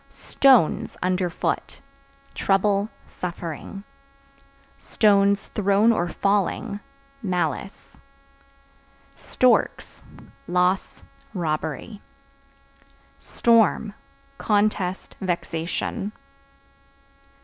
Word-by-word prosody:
Stones 260 - +2
(Under 180 0 0
foot) 170 - -3 0.5
trouble, 200 +1 +1 0.2
suffering; 175 +2 -7 1.0
(thrown 200 +1 +3
or 175 -6 0
falling) 200 +2 -1 0.4
malice. 180 - -3 1.1
Storks - - +1 0.5
Loss, 180 +2 0 0.3
robbery. 160 +4 -3 1.2
Storm 225 -2 +2 0.5
Contest, 205 -3 0
vexation. 175 +2 -3
195 Hz, 50 wpm, -24 LUFS, 175-210 Hz, 1.2 s, thrown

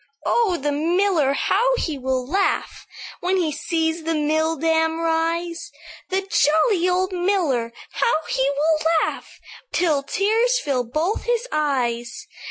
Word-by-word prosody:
"'Oh! 435 -7 +2
the 290 0 -2
miller, 330 -1 +1
how 475 - +2
he 320 -10 -2
will 260 -1 -2
laugh 385 +8 -1 0.3
When 370 +2 0
he 335 -4 0
sees 320 +2 -1
the 325 +1 -1
mill 315 +2 +1
dam 320 +1 +1
rise! 335 +1 -1 0.4
The 380 +1 0
jolly 340 - +3
old 370 +1 0
miller, 350 - 0 0.2
how - - +1
he 265 +1 +1
will 310 +2 +1 0.2
laugh - - -7 0.3
Till 320 -5 +1
the 275 - -24
tears 450 +5 +2
fill 270 - -1
both 315 - -2
his 480 0 0
eyes!' 255 - -1
325 Hz, 140 wpm, -22 LUFS, 295-370 Hz, 0.4 s, jolly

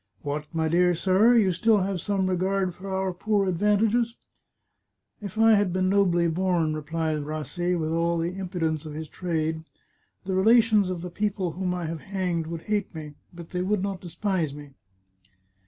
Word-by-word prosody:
" 95 - -43
What, 150 +1 -3
my 160 -1 0
dear 175 +2 +3
sir! 195 +7 +4
You 205 -5 +4
still 210 +4 +3
have 190 -2 -2
some 200 -2 0
regard 185 0 0
for 195 +3 -9
our 190 -1 -1
poor 205 +2 0
advantages? 210 +5 +1 0.4
" - - -52
" - - -48
If 205 +1 -7
I 225 0 +6
had 205 -3 +3
been 185 +1 +1
nobly 180 -4 +3
born," 170 -2 +1
replied 155 0 -2
Rassi, 155 +4 -2
with 155 0 -2
all 170 +1 +1
the 170 +2 -2
impudence 175 -5 -2
of 150 - -7
his 160 0 -5
trade, 160 -1 -2 0.3
" - - -44
the 190 - -2
relations 215 0 +4
of 180 -2 -3
the 180 0 -6
people 200 -3 -1
whom 180 +2 -2
I 175 -2 -3
have 160 -1 -5
hanged 180 -4 -2
would 165 0 -6
hate 210 -4 -2
me, 150 -2 -7 0.2
but 170 -1 -11
they 180 - -2
would 195 +1 0
not 195 -2 -3
de 175 - -8
spise 170 -4 -1
me." 145 -1 -11
180 Hz, 195 wpm, -26 LUFS, 165-195 Hz, 0.4 s, I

